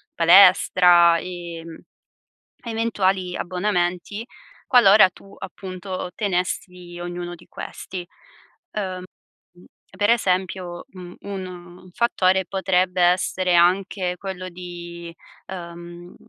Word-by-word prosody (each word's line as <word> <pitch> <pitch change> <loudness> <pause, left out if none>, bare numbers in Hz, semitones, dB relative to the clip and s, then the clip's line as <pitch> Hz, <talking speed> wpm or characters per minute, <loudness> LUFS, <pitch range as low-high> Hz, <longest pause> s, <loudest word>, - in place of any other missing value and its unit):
palestra, 175 -1 +6
e, 175 -2 -7
mhmm, 165 -1 -10 0.9
eventuali 195 -6 -1
abbonamenti, 180 +2 -2 0.4
qualora 210 -5 +7
tu, 195 +2 -17
appunto, 185 -1 -7
tenessi 180 -3 -3
ognuno 175 0 -5
di 170 - -19
questi. 180 -2 -7 0.7
Ehm, 185 -3 -4 0.5
uhm, 175 +1 -19 0.3
per 205 +2 +3
esempio, 185 -5 -1
mhmm, 180 -2 -11
un 195 -2 -6 0.4
un 185 - -16
fattore 190 -5 +1
potrebbe 185 -1 0
essere 180 0 +2
anche 180 +1 +2
quello 185 -2 -6
di, 175 -1 -9 0.3
uhm, 175 -1 -9
180 Hz, 95 wpm, -22 LUFS, 175-190 Hz, 0.9 s, qualora